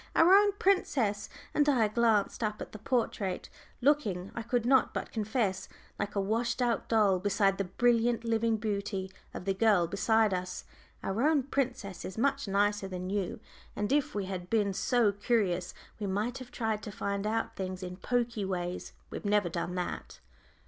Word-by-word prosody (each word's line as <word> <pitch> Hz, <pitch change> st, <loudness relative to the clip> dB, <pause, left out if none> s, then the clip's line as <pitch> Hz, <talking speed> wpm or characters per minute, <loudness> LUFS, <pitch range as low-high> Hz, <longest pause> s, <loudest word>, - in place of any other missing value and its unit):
Our 340 Hz, +3 st, +7 dB
own 405 Hz, 0 st, +6 dB
princess," 305 Hz, -, +1 dB, 0.2 s
and 295 Hz, 0 st, +3 dB
I 240 Hz, -6 st, +4 dB
glanced 215 Hz, -1 st, +2 dB
up 215 Hz, 0 st, -1 dB
at -, -, -7 dB
the 215 Hz, -, -9 dB
portrait, 215 Hz, -5 st, -1 dB, 0.3 s
looking, 215 Hz, -10 st, +1 dB
I 230 Hz, -, -4 dB
could 235 Hz, +1 st, -1 dB
not 265 Hz, +1 st, +3 dB
but -, -, -3 dB
confess, 215 Hz, -3 st, -1 dB, 0.3 s
like 205 Hz, 0 st, -3 dB
a -, -, +2 dB
washed 230 Hz, +5 st, 0 dB
out 240 Hz, -2 st, 0 dB
doll 210 Hz, -5 st, +4 dB
beside 195 Hz, 0 st, +2 dB
the 195 Hz, -, 0 dB
brilliant 235 Hz, +3 st, +2 dB
living 230 Hz, -1 st, +1 dB
beauty 200 Hz, -3 st, -3 dB, 0.2 s
of -, -, -7 dB
the 195 Hz, -, +1 dB
girl 200 Hz, -3 st, +4 dB
beside 215 Hz, +3 st, +2 dB
us, 180 Hz, 0 st, -3 dB, 0.4 s
"our 195 Hz, +4 st, -1 dB
own 295 Hz, -1 st, +3 dB
princess 245 Hz, -9 st, -2 dB
is 190 Hz, -, -7 dB
much 275 Hz, +1 st, +1 dB
nicer 205 Hz, 0 st, +1 dB
than 185 Hz, 0 st, -5 dB
you. 200 Hz, -3 st, -2 dB, 0.4 s
And 205 Hz, +3 st, -2 dB
if 285 Hz, -5 st, +1 dB
we 200 Hz, -2 st, -1 dB
had 180 Hz, -2 st, -5 dB
been 205 Hz, -3 st, +2 dB
so 235 Hz, +1 st, +2 dB
curious 200 Hz, -4 st, 0 dB, 0.3 s
we 205 Hz, -, -2 dB
might 215 Hz, +7 st, -1 dB
have 255 Hz, -1 st, -9 dB
tried 220 Hz, -4 st, -2 dB
to 210 Hz, -, -7 dB
find 200 Hz, +1 st, -2 dB
out 225 Hz, +1 st, -1 dB
things 185 Hz, -1 st, -4 dB
in 180 Hz, 0 st, -6 dB
pokey 235 Hz, 0 st, -1 dB
ways. 180 Hz, -2 st, -3 dB, 0.2 s
We've -, -, -6 dB
never 205 Hz, -3 st, +2 dB
done 175 Hz, +1 st, -3 dB
that." 180 Hz, -1 st, -4 dB
210 Hz, 175 wpm, -30 LUFS, 195-235 Hz, 0.4 s, Our